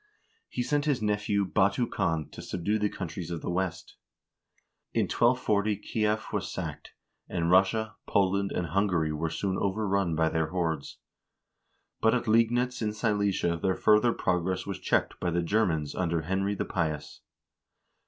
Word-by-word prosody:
He 125 - -2
sent 145 +2 0
his 145 -4 +1
nephew 105 -1 0
Batu 100 +6 +2
Khan 80 -8 -1
to - - -9
subdue 105 +5 -1
the 105 0 +1
countries 90 -3 -6
of 85 -2 -4
the - - -2
West. 90 -1 -3 1.0
In - - +3
1240 110 -4 +2
Kief 110 +1 -1
was - - -2
sacked, - - -6 0.4
and 85 -1 0
Russia, 100 +3 +3
Poland, 100 0 +2
and 85 -3 -2
Hungary 90 -4 +1
were 80 +2 -2
soon 95 +3 -2
over 100 +2 0
run 95 -4 +1
by 80 0 +2
their 80 -1 0
hordes; 80 -4 -2 1.0
but 110 +2 +4
at 120 - -1
Liegnitz 120 +3 +2
in 105 -1 -1
Silesia 100 -6 0
their 95 -1 +1
further 105 +3 +4
progress 90 -2 -1
was 100 -2 -4
checked - - 0
by 90 - 0
the 85 0 0
Germans 85 -6 +1
under 85 -3 -1
Henry 95 +4 0
the - - -2
Pious. 75 -4 -3
95 Hz, 155 wpm, -28 LUFS, 85-105 Hz, 1.0 s, but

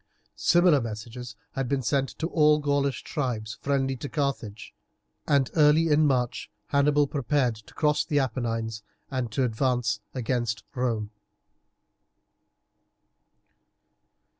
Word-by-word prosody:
Similar 175 -5 +4
messages 115 +2 -7 0.2
had 135 -2 -3
been 140 -2 0
sent 135 +2 +1
to 160 - -2
all 150 -3 +4
the - - -9
Gaulish 140 -2 0
tribes 110 -7 -3
friendly 135 -1 0
to 140 - -6
Carthage, 135 -8 -3 0.5
and 140 -3 +2
early 155 +1 +5
in 150 0 +4
March 125 -3 -1 0.2
Hannibal 145 +1 +3
prepared 140 -3 0
to 110 - -16
cross 150 -1 +2
the 150 - -1
Apennines 115 -4 -1 0.3
and 130 -4 -2
to 130 - 0
advance 120 -2 0 0.2
against 120 -4 -1
Rome. 115 -5 -1
130 Hz, 115 wpm, -26 LUFS, 115-145 Hz, 0.5 s, early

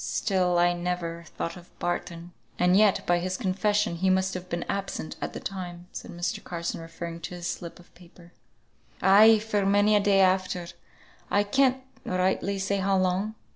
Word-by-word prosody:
Still 185 -4 +1
I 175 0 +4
never 175 -1 -3
thought 165 - -3
of 180 -1 -15
Barton." 175 0 -4 0.3
"And 180 +1 +3
yet 205 -1 +4
by 175 0 +2
his 185 +1 -2
confession 205 -2 0
he 190 +2 +1
must 190 0 +2
have 180 0 -7
been 170 0 -3
absent 195 -5 -4
at - - -4
the - - -5
time," 175 -2 -6
said - - -8
Mr. 175 -1 -4
Carson, 170 -1 -4
referring 165 +1 -7
to 170 +2 -7
his 175 -1 -7
slip 170 0 -5
of 175 - -19
paper. 175 0 -18 0.7
"Ay, 200 +3 +7
and 220 -1 +6
for 210 -2 0
many 205 +2 +4
a - - +5
day 200 -1 +3
after, 185 -1 +1 0.6
I 205 - +3
can't 260 +4 +2 0.2
rightly 185 +2 0
say 195 +1 -1
how 195 0 +1
long. 185 +4 0
185 Hz, 180 wpm, -27 LUFS, 175-200 Hz, 0.7 s, Ay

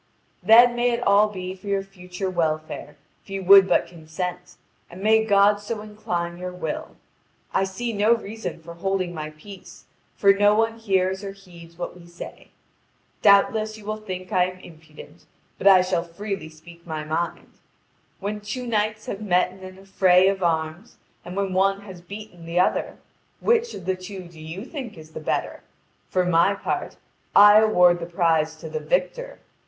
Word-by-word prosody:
"Then 235 +5 +7
may 240 +1 +2
it 240 0 -1
all 200 +1 +5
be 185 -2 -6
for 190 +2 -14
your 200 -1 0
future 185 -1 -7
welfare 155 -4 -2 0.3
if - - -22
you 195 0 -4
would 195 +1 +8
but 180 - +2
consent, 180 +2 -6 0.3
and 185 +3 -10
may 220 +1 +4
God 205 -1 +4
so 210 +1 -5
incline 175 -5 -4
your 180 0 -5
will! 160 -4 -5 0.6
I 195 - +2
see 230 +5 -4
no 215 +3 +3
reason 220 -6 -7
for 170 +1 -9
holding 185 0 -2
my 155 -2 -5
peace, 180 +6 -13 0.3
for 200 -1 +5
no 205 +1 +4
one 225 +1 0
hears 190 -2 0
or 195 -1 -6
heeds 170 -4 -15
what 175 - -5
we 175 -1 -15
say. 170 0 -10 0.7
Doubtless 215 +2 +4
you 210 - -14
will 215 +1 -3
think 185 -4 -7
I 180 -1 +3
am 185 0 -7
impudent, 155 -1 -15 0.3
but 195 - +1
I 190 -2 +8
shall 180 -2 0
freely 195 0 -6
speak 170 +2 -16
my 155 -2 -4
mind. 160 +3 -3 0.7
When 210 +1 -4
two 245 +5 -5
knights 215 -2 -1
have 200 - -5
met 180 -3 +2
in 190 - -15
an 185 0 -11
affray 190 -1 +3
of 195 -1 -2
arms 165 +5 -2 0.3
and 180 - -8
when 195 -1 -1
one 195 +1 +2
has 190 -4 -11
beaten 180 -2 -10
the 170 +1 0
other, 180 - 0 0.4
which 475 0 +1
of 185 - -9
the 190 0 0
two 185 +1 -8
do 170 -2 -14
you 165 +7 -7
think 260 - -7
is 155 0 -13
the - - -7
better? 155 - -3 0.5
For 185 -1 +1
my 180 +3 +3
part - - -4 0.4
I 205 +1 +9
award 180 -5 +4
the 170 - -6
prize 165 -3 +1
to 155 - -9
the 470 - -4
victor. - - -2
190 Hz, 180 wpm, -23 LUFS, 175-210 Hz, 0.7 s, I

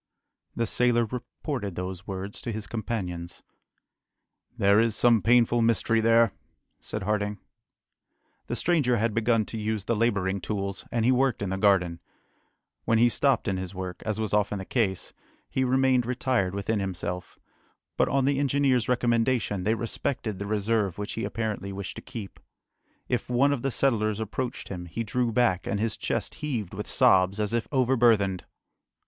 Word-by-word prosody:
The 115 - 0
sailor 120 +1 +2
reported 120 - -5
these 90 +1 -5
words 95 +1 -5
to 120 - -4
his 110 -1 -4
companions. 90 -6 -5 1.1
"There 100 +1 +4
is 115 -1 +2
some 120 -3 +4
painful 120 0 +4
mystery 115 0 +2
there!" 115 -1 +4 0.5
said 105 - -5
Harding. 105 0 -1 1.1
The - - -2
stranger 145 -9 +2
had 115 0 0
begun 115 -1 +2
to 110 - -6
use 105 -2 -2
the 115 - +1
labouring 100 -4 0
tools, 100 -2 -3
and 115 -2 0
he 125 - +5
worked 130 -4 +1
in 95 - -2
the 95 - -1
garden. 90 -4 +3 0.8
When 115 - +2
he 120 +2 +5
stopped 135 +1 +1
in 95 -2 0
his 95 +1 -6
work, 90 -1 -6
as 110 -1 -2
was 110 -2 -2
often 105 0 +1
the 95 - -6
case, 100 -6 -1 0.3
he 130 - -1
remained 130 -1 +2
retired 125 -7 0
within 100 +2 -1
himself; 90 -2 -4 0.6
but - - +2
on 135 -1 +2
the 140 0 +2
engineer's 135 -4 +2
recommendation, 120 -5 +1
they 110 +2 +2
respected 115 -2 -3
the 100 - -4
reserve 105 -2 0
which 105 0 -4
he 115 - -3
apparently 105 -4 -3
wished 95 0 -6
to - - -6
keep. 105 -6 -8 0.7
If - - -2
one 135 +4 +3
of 135 - -3
the 135 - 0
settlers 110 -5 +1
approached 120 +3 -4
him, 90 -2 -6
he 100 +8 -3
drew 120 +2 0
back, 105 -6 +1
and 100 - -1
his 110 +1 -1
chest - - -2
heaved 120 - -3
with - - -5
sobs, 95 +2 +4
as 105 +1 -1
if 115 -1 0
overburthened! 115 - +3
110 Hz, 165 wpm, -27 LUFS, 100-120 Hz, 1.1 s, he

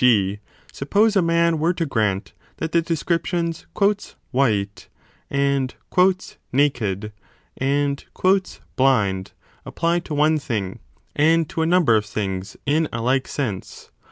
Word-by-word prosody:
g. 105 -5 +3 0.3
suppose 210 +10 +2
a 195 - +5
man 170 -1 +2
were 170 +3 +1
to 165 - -1
grant 105 -7 -1 0.2
that 160 - -3
the 170 - +3
descriptions 170 +1 -1 0.6
white 105 -7 0 0.4
and 140 -2 0 0.8
naked 110 -7 0 0.4
and 140 +1 0 0.7
blind 100 -8 +2 0.3
apply 170 +1 0
to 165 -3 -6
one 155 +1 +3
thing 105 -9 -3 0.4
and 160 +1 +3
to 160 - -3
a 160 - +2
number 170 -9 +4
of 105 -1 +1
things 95 -3 -4
in 150 +2 +1
a 115 - -3
like 130 +3 +1
sense. 110 -10 -5
140 Hz, 125 wpm, -22 LUFS, 110-165 Hz, 0.8 s, a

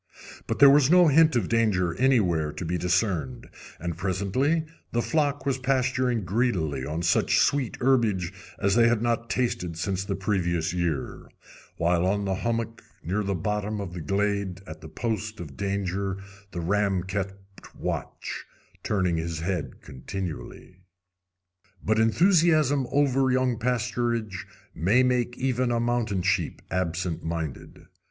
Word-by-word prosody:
But - - -1
there 140 - +8
was 140 -1 +5
no 175 -1 +6
hint 160 +1 +5
of 110 -7 +1
danger 105 -7 +1
anywhere 90 - +2
to 85 - -5
be 85 +2 -1
discerned; 90 - -1 0.3
and 85 0 -3
presently 100 - 0 0.3
the 120 - +1
flock 145 -3 0
was 135 -2 0
pasturing 130 -3 +1
greedily 90 - 0
on 80 +5 -3
such 85 - +3
sweet 140 -5 +1
herbage 110 -9 +2 0.2
as 100 0 +1
they 115 +1 +5
had 115 -1 +1
not 115 0 0
tasted 90 -9 -1
since 95 +2 -2
the 100 0 -3
previous 90 -4 -1
year, 85 -6 -3 0.5
while 85 +1 +2
on 100 +1 0
a 95 - +1
hummock 115 +3 -2 0.2
near 95 +6 -1
the 100 -1 -1
bottom 105 +4 -2
of 95 -4 -5
the 90 - -5
glade, 100 +1 -1
at 80 -2 -10
the 80 - -10
post 110 +1 -3
of 75 -5 -8
danger, 100 -1 -2 0.3
the 85 - -5
ram 95 +1 +1
kept 95 0 -3 0.4
watch, - - -5 0.4
turning 95 -5 0
his 80 0 -3
head 90 -2 -3
continually. 90 +5 -7 1.1
But 110 +2 +2
enthusiasm 155 - +3
over 135 -2 +2
young 125 -2 +1
pasturage 115 -4 -1 0.3
may 105 +10 +3
make 125 -1 0
even 130 -1 0
a 120 -1 +1
mountain 115 -5 0
sheep 95 -4 0
absent 90 -1 -2
minded. 80 -5 -5
100 Hz, 145 wpm, -26 LUFS, 90-120 Hz, 1.1 s, there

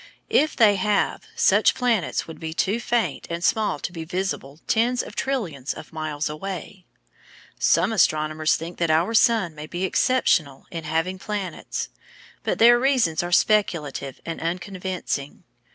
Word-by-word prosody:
If 310 +2 +3
they 210 -4 +5
have, 205 - 0
such 465 - +4
planets 240 -7 0
would 160 -2 -9
be 160 0 -5
too 205 +7 +1
faint 235 -1 -1
and 170 0 -4
small 215 +4 +1
to - - -5
be 165 -2 -6
visible 165 -5 -4
tens 240 +3 +1
of - - -10
trillions 175 - -2
of - - -11
miles 155 -2 -3
away. 185 +3 -7 0.7
Some 225 - +3
astronomers 155 -4 +2
think 170 +2 -7
that 170 -1 +1
our 165 +7 +2
sun 220 -7 +3
may 150 0 -8
be 175 +3 -4
exceptional 170 - +1
in 165 -2 -5
having 165 +4 -1
planets, 200 -5 -4 0.5
but - - -1
their 240 +1 +7
reasons 245 - +2
are 175 0 -4
speculative 165 - +1
and 165 - -5
unconvincing. 180 -4 -4
180 Hz, 150 wpm, -24 LUFS, 160-215 Hz, 0.7 s, their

